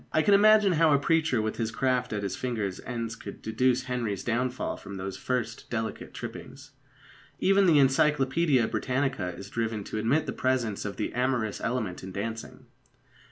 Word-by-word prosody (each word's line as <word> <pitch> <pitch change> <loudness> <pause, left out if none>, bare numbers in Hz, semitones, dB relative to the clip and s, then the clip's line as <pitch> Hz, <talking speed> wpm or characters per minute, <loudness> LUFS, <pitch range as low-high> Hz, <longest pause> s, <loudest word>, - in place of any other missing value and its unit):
I 155 - +2
can 205 - +4
imagine 210 0 +6
how 165 -2 +4
a - - +5
preacher 155 -6 +2
with 110 - -3
his 115 -2 -1
craft 125 +2 0
at 105 -1 -2
his 100 - -2
fingers' 110 -7 -3
ends 115 -2 -3
could - - -9
deduce 125 +3 +1
Henry's 120 -6 -3
downfall 125 +2 -1
from 100 - -9
those 95 0 -5
first 120 -3 -3
delicate 110 -2 -4
trippings. - - -9 0.7
Even 195 0 +4
the 160 -3 +6
Encyclopædia 135 -1 +3
Britannica 125 -9 -1
is 95 +3 -10
driven 115 -2 -2
to 110 - -4
admit 135 +9 +1
the - - -4
presence 125 -6 -1
of 100 - -5
the 105 - -3
amorous 125 -4 -1
element 110 -7 -2
in 95 - -8
dancing. 110 +4 -6
120 Hz, 170 wpm, -28 LUFS, 110-135 Hz, 0.7 s, imagine